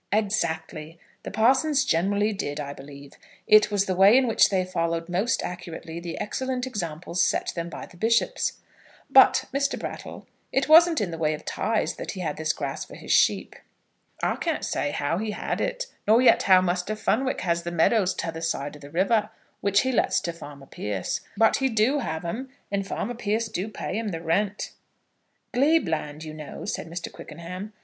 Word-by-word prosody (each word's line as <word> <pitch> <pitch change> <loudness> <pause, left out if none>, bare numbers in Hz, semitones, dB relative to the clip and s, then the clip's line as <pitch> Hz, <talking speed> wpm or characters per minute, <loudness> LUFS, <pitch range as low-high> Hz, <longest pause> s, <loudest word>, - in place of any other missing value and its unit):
"Exactly. 165 -6 -1 0.2
The - - -6
parsons 265 +6 +3
generally 205 +2 +1
did, 145 -7 -4
I 140 -1 -4
believe. 140 0 -12 0.3
It 215 0 +6
was 200 -1 +1
the 185 - -1
way 195 +6 +7
in 265 - +4
which 230 - +4
they 185 -2 +1
followed 170 -2 -2
most 185 +7 0
accurately 170 -2 -6
the 170 -1 -6
excellent 260 +3 -2
examples 175 -6 -2
set 165 - 0
them 170 0 -3
by - - -7
the 175 - -17
bishops. 230 +5 +1 0.6
But, - - +6
Mr. 280 0 0
Brattle, - - -7 0.3
it 270 +1 +1
wasn't 325 -1 +7
in 190 -4 -2
the 165 - -6
way 155 -1 +1
of - - -13
tithes 220 -1 -1
that - - -5
he 190 - -6
had 155 -4 -3
this 155 0 0
grass 140 -3 -4
for - - -12
his - - -7
sheep?" - - +3 0.7
"I - - +1
can't - - -2
say 145 - -1
how 145 +4 -1
he 220 +1 -3
had - - -3
it, - - -2 0.2
nor 220 +2 +6
yet 255 - +5
how 185 -1 +6
Muster 180 +3 -1
Fenwick 255 +4 0
has 170 -2 0
the 170 - -4
meadows 185 +3 +2
t'other 165 -1 -4
side 150 -3 -2
of 150 - -13
the 140 - -10
river, 205 +6 +1 0.3
which 200 0 +3
he 260 - 0
lets 245 - +2
to 170 - -3
farmer 145 -4 -11
Pierce; 105 -7 -3 0.2
but 225 +1 +4
he 265 -1 +1
do 230 +5 +2
have 160 - -4
'em, 245 +10 -4 0.2
and 195 -1 -1
farmer 240 +4 -3
Pierce 225 -1 -1
do 190 +1 -3
pay 215 0 -4
him 225 - -3
the 170 -5 -3
rent." 195 +5 -1 0.8
"Glebe 295 +6 +3
land, 155 -1 -3
you 155 -1 -7
know," 155 -1 -8
said - - -4
Mr. 170 0 -5
Quickenham. 180 +6 -8
185 Hz, 190 wpm, -25 LUFS, 165-225 Hz, 0.8 s, way